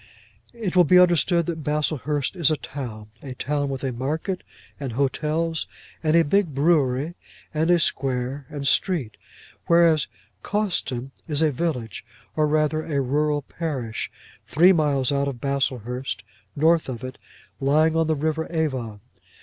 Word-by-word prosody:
It 210 Hz, -6 st, -3 dB
will 180 Hz, -, +7 dB
be 180 Hz, +3 st, +5 dB
understood 175 Hz, -1 st, +4 dB
that 160 Hz, -2 st, -4 dB
Baslehurst 150 Hz, 0 st, -1 dB
is 170 Hz, -6 st, +3 dB
a 155 Hz, -, +1 dB
town, 110 Hz, -9 st, -7 dB
a 130 Hz, -2 st, -7 dB
town 145 Hz, +2 st, -1 dB
with 135 Hz, 0 st, -4 dB
a 135 Hz, -, 0 dB
market, 155 Hz, -, -3 dB, 0.4 s
and 135 Hz, -5 st, -4 dB
hotels, 155 Hz, +5 st, -1 dB, 0.3 s
and 155 Hz, 0 st, +2 dB
a 170 Hz, -, +6 dB
big 175 Hz, -2 st, +1 dB
brewery, 145 Hz, -1 st, +2 dB, 0.4 s
and 160 Hz, +2 st, +1 dB
a 175 Hz, -, +6 dB
square, 135 Hz, -2 st, -1 dB
and 140 Hz, -2 st, -3 dB
street; 140 Hz, -, +1 dB, 0.5 s
whereas 170 Hz, -3 st, +4 dB, 0.3 s
Cawston 170 Hz, -, -1 dB, 0.2 s
is 150 Hz, 0 st, +1 dB
a 155 Hz, -, +3 dB
village, 125 Hz, -, -3 dB, 0.3 s
or 155 Hz, -1 st, +2 dB
rather 155 Hz, +1 st, +1 dB
a 145 Hz, -3 st, -1 dB
rural 145 Hz, +2 st, 0 dB
parish, 135 Hz, -9 st, -4 dB, 0.4 s
three 175 Hz, +8 st, +6 dB
miles 145 Hz, -6 st, +1 dB
out 140 Hz, 0 st, +1 dB
of 135 Hz, -4 st, -4 dB
Baslehurst, 130 Hz, -2 st, -2 dB, 0.3 s
north 160 Hz, +1 st, +3 dB
of 125 Hz, -1 st, -6 dB
it, 130 Hz, 0 st, -7 dB, 0.4 s
lying 155 Hz, +4 st, +3 dB
on 165 Hz, -1 st, +2 dB
the 160 Hz, -, +2 dB
river 160 Hz, +2 st, -1 dB
Avon. 130 Hz, -10 st, -2 dB
150 Hz, 150 wpm, -24 LUFS, 135-160 Hz, 0.5 s, will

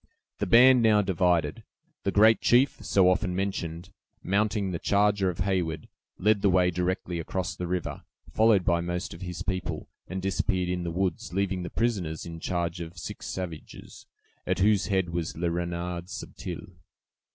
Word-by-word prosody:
The -, -, -1 dB
band 125 Hz, +1 st, +7 dB
now 105 Hz, -2 st, +4 dB
divided. 90 Hz, -2 st, +1 dB, 0.4 s
The 100 Hz, -, +2 dB
great 110 Hz, +3 st, +5 dB
chief, 125 Hz, -2 st, +3 dB
so 95 Hz, -2 st, +4 dB
often 90 Hz, 0 st, +1 dB
mentioned, 90 Hz, -2 st, -3 dB, 0.3 s
mounting 100 Hz, 0 st, 0 dB
the 85 Hz, -, -3 dB
charger 100 Hz, -1 st, +2 dB
of 90 Hz, +1 st, -5 dB
Heyward, 90 Hz, -4 st, -1 dB, 0.3 s
led 105 Hz, +1 st, +2 dB
the 100 Hz, -, +4 dB
way 90 Hz, -1 st, +3 dB
directly 90 Hz, 0 st, -2 dB
across 90 Hz, +2 st, -3 dB
the 90 Hz, -, -4 dB
river, 90 Hz, -1 st, -3 dB, 0.3 s
followed 110 Hz, -4 st, +4 dB
by 85 Hz, 0 st, +2 dB
most 85 Hz, +1 st, -3 dB
of 85 Hz, -, -11 dB
his 90 Hz, -2 st, -5 dB
people, 95 Hz, -2 st, -3 dB, 0.2 s
and 95 Hz, +1 st, -4 dB
disappeared 95 Hz, -1 st, -1 dB
in 90 Hz, 0 st, -1 dB
the 85 Hz, -, -3 dB
woods, 90 Hz, -1 st, -2 dB
leaving 95 Hz, -1 st, 0 dB
the 90 Hz, -, -5 dB
prisoners 95 Hz, -10 st, -1 dB
in 85 Hz, -1 st, -7 dB
charge 85 Hz, -1 st, -2 dB
of 85 Hz, +1 st, -8 dB
six 80 Hz, -, -7 dB
savages, 85 Hz, -4 st, -7 dB, 0.4 s
at -, -, +1 dB
whose 105 Hz, 0 st, +3 dB
head 95 Hz, -3 st, +1 dB
was 85 Hz, -2 st, -3 dB
Le 85 Hz, 0 st, 0 dB
Renard 85 Hz, 0 st, -3 dB
Subtil. 90 Hz, -2 st, -7 dB
90 Hz, 165 wpm, -27 LUFS, 85-100 Hz, 0.4 s, band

